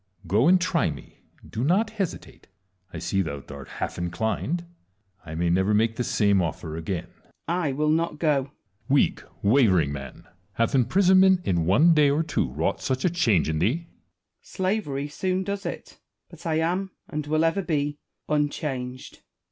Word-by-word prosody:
Go, 105 - +3
and 185 +1 +6
try 175 - +1
me; 70 -2 -10 0.3
do 115 - -4
not 190 +10 +2
hesitate: 200 -6 -5 0.4
I - - -7
see 90 +4 0
thou 70 -6 -4
art - - -9
half - - -5
inclined; 110 - -2 0.6
I 80 - -6
may 85 +1 +1
never 95 +4 +2
make 115 +1 +2
the 125 - -1
same 100 -4 +2
ofier 80 -2 -3
again. 80 +2 -3
Wallace. - - -32 0.2
I 170 -4 0
will 150 +2 +1
not 165 -1 0
go. 150 -1 +2
Edward. 135 0 -4 0.4
Weak, 140 +1 +2 0.2
wavering 100 - +4
man! 70 -2 -8 0.3
hath 115 +4 0
imprisonment 185 - +5
in 85 -3 +1
one 150 - +5
day 150 -2 +5
or 150 +3 +1
two 160 - -1
wrought 80 +8 -1
such 130 +3 -1
a 180 - +3
change 115 - +2
in 80 -1 -1
thee? 130 - 0
Wallace. - - -29 0.5
Slavery 185 -8 -2
soon 185 +5 -1
does 200 0 -4
it; - - -8 0.3
but - - -9
I 160 - +1
am, 175 +4 0 0.2
and 150 0 -4
will 155 +2 +2
ever 165 +5 +1
be, 145 -4 -1 0.3
unchanged. 145 -4 -2
Edward. - - -32
140 Hz, 175 wpm, -25 LUFS, -, 0.6 s, and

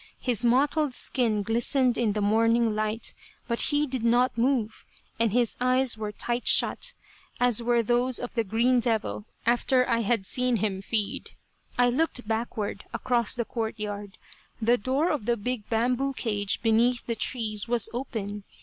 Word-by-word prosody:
His 245 -3 +1
mottled 275 +3 +2
skin 225 -5 +2
glistened 240 +3 +2
in 225 -4 0
the 210 - -2
morning 225 +1 +2
light, 215 +1 -2 0.3
but 235 -2 0
he 295 0 +1
did 260 -4 -4
not 240 +2 +2
move, 235 -2 0 0.4
and 230 -2 +2
his 240 0 +1
eyes 255 -1 +3
were 215 -1 -5
tight 240 +3 -2
shut, - - +3 0.4
as 245 -2 +3
were 235 0 +2
those 245 +2 +1
of 245 - -5
the 230 - 0
"green 235 +5 +2
devil" 215 - -1 0.2
after 250 +2 +2
I 230 -1 +1
had 225 -2 0
seen 250 +3 0
him 195 -3 -2
feed. 215 +4 -2 0.4
I 245 0 +4
looked 255 -4 -1
backward, 220 -2 -3
across 240 -3 +1
the 240 -2 -2
court 225 -1 -4
yard. 205 -1 -6 0.4
The 235 +2 +2
door 270 +9 0
of 280 -8 -3
the 240 0 +2
big 230 0 -4
bamboo 250 +4 0
cage 210 -5 -1
beneath 235 +2 +2
the 235 - -1
trees 220 -3 -2
was 235 -3 +2
open. 210 -5 -5
235 Hz, 165 wpm, -26 LUFS, 215-250 Hz, 0.4 s, I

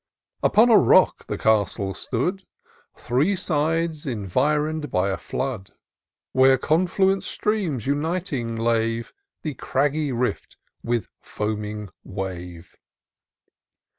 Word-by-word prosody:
Upon 235 +3 +5
a 215 - +8
rock 120 - +4
the - - -3
castle 100 -2 +1
stood, 175 - -2 0.5
Three 145 - +1
sides 160 -2 -1
environed 150 - 0
by 95 -2 +1
a 95 - -2
flood. 125 -8 -4 0.6
Where 130 0 +5
confluent 185 +6 +2
streams 185 - -2
uniting 145 -4 -1
lave 115 0 0 0.3
The 155 - -3
craggy 145 +3 0
rift 125 0 -2 0.2
with 120 -2 -1
foaming 105 -1 -4
wave. 90 -3 -7
130 Hz, 100 wpm, -24 LUFS, 110-155 Hz, 0.6 s, a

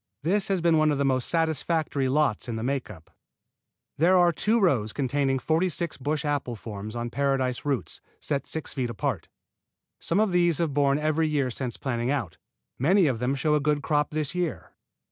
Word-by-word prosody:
This 195 +6 +1
has 195 -3 0
been 165 -2 +4
one 155 0 +4
of 145 - +1
the 140 - +1
most 130 -2 +1
satisfactory 160 -3 0
lots 135 -5 +1
in 115 - -2
the 110 - -4
make 135 +1 -2
up. 80 -6 -13 0.9
There 180 +4 +5
are 175 -1 +5
two 220 +7 +1
rows 125 - +2
containing 135 0 0
forty 160 +8 +1
six 170 -1 -3
bush 145 +2 -2
form 145 - 0
apples 110 -5 -6
on 120 0 -3
paradise 135 -2 0
roots 140 -4 -2 0.2
set 140 -2 -2
six 160 - -3
feet 130 -3 -2
apart. 115 - -3 0.7
Some 170 - 0
of 215 -2 +2
these 175 -3 +3
have 165 -4 0
borne 140 0 +3
every 155 +1 +1
year 140 -4 0
since 120 -1 -4
planting 120 -2 -2
out, 115 - -2 0.4
many 180 +8 +4
of 130 -6 0
them 125 +3 0
showing 150 +2 +2
a - - 0
good 145 0 0
crop 150 -1 +1
this 155 -1 -2
year. 180 -3 -3
145 Hz, 195 wpm, -26 LUFS, 130-160 Hz, 0.9 s, There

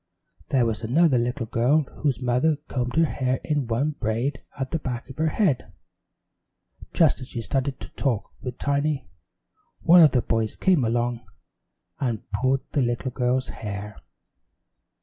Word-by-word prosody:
There 130 -3 +3
was 115 -2 -1
another 135 +3 +3
little 120 +1 -1
girl 125 +7 +2 0.2
whose 135 -5 0
mother 125 +6 +2
combed 125 -1 -2
her 165 0 +5
hair 130 -4 -1
in 145 -5 -1
one 125 +7 0
braid 125 +1 -2 0.2
at 135 -1 -3
the 165 - 0
back 125 -5 -4
of 130 - -13
her 160 - +2
head. 155 - +1 1.2
Just 160 -5 +3
as 125 - -7
she 120 - -5
started 135 +3 -2
to - - -9
talk 125 -7 -2
with 125 -1 -5
Tiny, 145 - 0 0.7
one 175 +1 +7
of 155 -5 +7
the 125 - +2
boys 115 -1 -1
came 180 -8 +3
along, 120 +1 0 0.8
and 120 -6 -1
pulled 130 +5 +1
the 145 - +1
little 120 +1 -1
girl's 125 +1 0
hair. 105 0 -6
130 Hz, 155 wpm, -25 LUFS, 120-145 Hz, 1.2 s, one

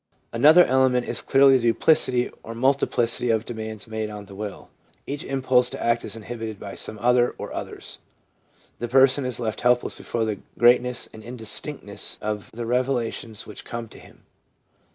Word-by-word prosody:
Another 155 +9 +7
element 130 -1 +2
is - - -2
clearly 135 -1 +5
the 120 -2 0
duplicity 125 0 +2
or 115 - -8
multi 135 +4 +2
plicity 120 0 0
of 110 0 0
demands 110 -3 -6
made 110 -1 -3
on 105 -1 -8
the 100 - -13
will. 105 +1 -7 0.3
Each 140 +1 -5
impulse 130 -2 +2
to - - -7
act 120 0 +1
is - - -6
inhibited 110 -1 -6
by 100 - -7
some 110 - -6
other 125 +2 +2
or - - -7
others. - - -7 0.8
The 120 - -3
person 135 +2 +4
is 125 -1 -3
left 110 -3 -3
helpless 125 0 +2
before 115 -1 -3
the 105 -2 -3 0.2
greatness 125 +1 +3
and 110 - -11
indistinctness 115 0 -4
of 105 -1 -4
the 115 +1 -6
revelations 120 -3 -2
which - - -9
come 115 -1 -6
to - - -14
him. - - -18
120 Hz, 175 wpm, -24 LUFS, 110-125 Hz, 0.8 s, Another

